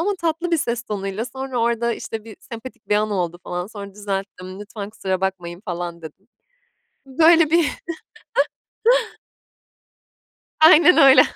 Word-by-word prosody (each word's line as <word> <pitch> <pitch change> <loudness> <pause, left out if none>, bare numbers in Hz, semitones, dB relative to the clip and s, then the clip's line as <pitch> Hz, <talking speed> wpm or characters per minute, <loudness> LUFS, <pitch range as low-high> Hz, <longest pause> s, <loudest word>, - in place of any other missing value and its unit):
Ama 405 +4 0
tatlı 335 +1 -1
bir 335 - +3
ses 240 -4 -1
tonuyla 205 -1 -4
sonra 265 -1 -5
orada 235 0 +1
işte 225 -1 -6
bir 220 -2 -11
sempatik 230 +3 -10
bir 210 - +3
an 215 0 0
oldu 175 -3 -2
falan. 180 0 -4
Sonra 200 -2 -9
düzelttim, 195 -2 -5
"Lütfen, 205 -1 -7
kusura 190 -3 -3
bakmayın." 180 -2 -3
falan 175 -2 -5
dedim. 175 +7 -12 0.8
Böyle 320 +3 +5
bir 335 -3 +4 2.9
Aynen 320 +3 +8
öyle. 270 -2 +8
215 Hz, 130 wpm, -21 LUFS, 190-265 Hz, 2.9 s, Aynen